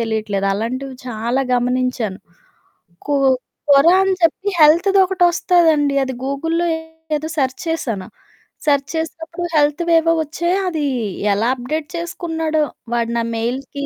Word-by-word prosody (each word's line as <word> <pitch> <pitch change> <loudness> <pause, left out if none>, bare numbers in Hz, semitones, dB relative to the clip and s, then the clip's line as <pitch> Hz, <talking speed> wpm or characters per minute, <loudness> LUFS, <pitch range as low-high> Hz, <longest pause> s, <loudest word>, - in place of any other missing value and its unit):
తెలీట్లేదు. 215 -3 -1
అలాంటివి 255 +5 -4
చాలా 235 +3 -1
గమనించాను. 245 -4 -1 0.9
కు 290 - +1 0.6
కొరా 310 +6 +6
అని 385 0 +2
చెప్పి 385 +4 +1
హెల్త్‌దొకటొస్తాదండి 345 -3 +4
అది 260 0 -3
గూగుల్‌లో 325 +5 -1 0.5
ఏదో 310 +1 -3
సర్చ్ 260 -2 0
చేశాను, 230 -12 -2 0.6
సర్చ్ 285 -1 +2
చేసినప్పుడు 330 +1 -4
హెల్త్‌వేవో 330 +2 +3
ఒచ్చాయి, 345 +5 -1
అదీ 315 -4 -1 0.5
ఎలా 225 +5 +1
అప్డేట్ 295 +5 -4
చేసుకున్నాడో, 325 -2 -2 0.3
వాడు 235 -1 0
నా 230 - +1
మెయిల్‌కి 265 +4 -3
290 Hz, 110 wpm, -19 LUFS, 250-330 Hz, 0.9 s, కొరా